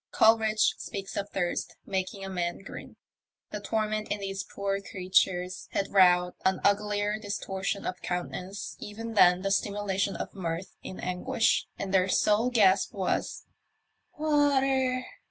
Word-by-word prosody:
Coleridge 220 -1 +4
speaks 195 -3 -6
of 200 0 -3
thirst 175 -3 -2
making 195 0 -3
a - - -5
man 175 0 -3
grin. - - -9 0.6
The 210 - -4
torment 215 +1 -1
in 205 - -1
these 195 0 -4
poor 200 0 -3
creatures 185 -1 0
had 195 - -1
wrought 180 -2 +5
an 190 0 +2
uglier 205 +1 +1
distortion 200 -1 -3
of 180 - -4
countenance 180 +2 -4
even 225 +2 -6
than 180 -3 +5
the 195 - 0
simulation 200 0 0
of - - -5
mirth 180 -1 -4
in 185 - -8
anguish, 220 +7 +1
and 195 -1 -4
their 190 0 +3
sole 215 +5 +3
gasp 200 -6 +3
was, 190 -2 -2 0.4
" - - -40
Water 270 -4 +2
200 Hz, 140 wpm, -28 LUFS, 185-215 Hz, 0.6 s, wrought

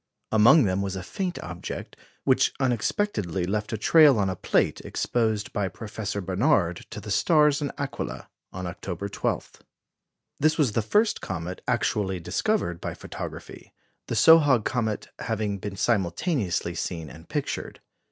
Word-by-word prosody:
Among 115 +8 +7
them 95 -2 0
was 95 -1 -3
a 95 - -5
faint 180 - -3
object, 85 +1 -7 0.3
which - - +3
unexpectedly 115 - 0
left 105 +3 -2
a 110 - -1
trail 150 +3 +6
on 100 -2 +1
a - - -4
plate - - +1
exposed 110 -3 -1
by 100 -2 0
Professor 105 +1 -5
Barnard 95 - +1
to - - -7
the 105 +1 -7
stars 150 - +4
in 145 - -2
Aquila 140 -1 -4 0.2
on 90 0 -6
October 90 +2 -5
12. - - -3 0.8
This 155 +2 +3
was 145 -8 +3
the 115 - +1
first 210 - +2
comet 90 0 -5
actually 95 -3 0
discovered 85 - -1
by - - -4
photography, - - -8 0.3
the - - -2
Sohag 145 -8 +6
comet 110 -4 -1
having 105 -3 -2
been 100 0 -5
simultaneously 95 - 0
seen 85 -1 -4
and 65 - -13
pictured. - - -3
105 Hz, 145 wpm, -26 LUFS, 95-135 Hz, 0.8 s, Among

